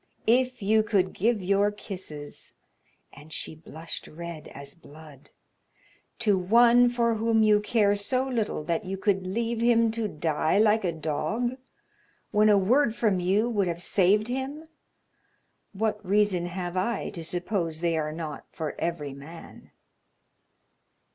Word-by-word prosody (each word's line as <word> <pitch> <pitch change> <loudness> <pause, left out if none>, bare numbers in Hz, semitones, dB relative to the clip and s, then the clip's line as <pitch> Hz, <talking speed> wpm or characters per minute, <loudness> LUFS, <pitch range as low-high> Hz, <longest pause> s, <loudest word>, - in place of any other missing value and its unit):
If 250 0 +2
you 215 +2 +4
could 200 -4 0
give 215 0 0
your 200 +2 +3
kisses" 185 -8 -8 0.6
and 150 +3 -14
she 155 - -4
blushed 160 +1 -9
red 170 -1 -8
as 140 0 -10
blood 150 -4 -15 0.9
"to 205 -4 +2
one 235 +5 +5
for 235 -1 +1
whom 225 0 +2
you 210 -1 +5
care 210 -1 +2
so 255 +6 0
little 225 -10 -2
that 165 +1 -1
you 190 +1 -4
could 190 -1 0
leave 230 +4 -2
him 230 -1 +4
to 225 -1 -2
die 155 -1 0
like 215 0 +4
a 180 - 0
dog, 190 - -2 0.8
when 215 +1 +4
a 205 - +6
word 230 +5 +2
from 210 -6 +1
you 195 +6 +1
would 205 -5 0
have 170 0 -3
saved 205 +4 +3
him, 270 +5 -4 1.0
what 215 +2 -2
reason 195 -2 +1
have 175 0 -5
I 200 +4 -1
to 170 -5 -7
suppose 175 -1 -2
they 170 -1 +1
are 155 -1 -1
not 155 -2 -7
for 155 -2 -4
every 150 -5 -3
man?" 155 +5 -12
200 Hz, 145 wpm, -27 LUFS, 170-225 Hz, 1.0 s, a